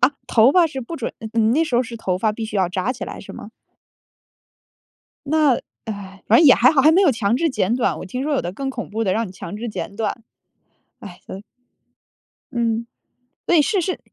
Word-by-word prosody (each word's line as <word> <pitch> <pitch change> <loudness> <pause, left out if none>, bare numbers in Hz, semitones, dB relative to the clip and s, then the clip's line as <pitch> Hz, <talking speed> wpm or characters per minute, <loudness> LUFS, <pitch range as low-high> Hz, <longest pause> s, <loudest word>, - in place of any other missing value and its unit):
啊， - - +5 0.2
头 235 +4 +4
发 355 -2 +5
是 275 -4 -6
不 260 +7 -7
准 245 - -4
嗯 220 - -7
你 230 - +2
那 315 +6 +2
时 285 -6 -4
候 245 - +3
是 235 -1 -8
头 185 -5 -2
发 215 +2 +1
必 225 +1 -5
须 215 -1 -5
要 190 -2 +2
扎 185 +6 -2
起 235 -7 -6
来 - - -8
是 - - -11
吗？ 210 - -10 1.8
那， 300 -4 +3 0.3
唉， 195 -3 -8
反 225 - +6
正 325 - +6
也 270 - +9
还 250 +2 +5
好， 300 - +3
还 305 +4 +6
没 370 +4 +4
有 355 - +5
强 225 -2 0
制 330 +2 +1
剪 230 -3 0
短， 250 - 0
我 - - -7
听 250 +8 -4
说 300 - -1
有 - - +1
的 175 - -5
更 270 +6 -4
恐 250 -3 -6
怖 220 +2 -2
的 190 -4 +1
让 230 +1 -1
你 185 - -11
强 190 +1 -8
制 235 +3 -5
剪 200 -1 -6
短。 225 +1 -3 0.8
唉， 180 -4 -11
呃， 190 - -7 1.1
嗯， 235 -2 -1 0.6
对， 335 -4 +4
是 390 +5 +1
是， 370 +2 -3
235 Hz, 240 characters per minute, -21 LUFS, 205-275 Hz, 1.8 s, 也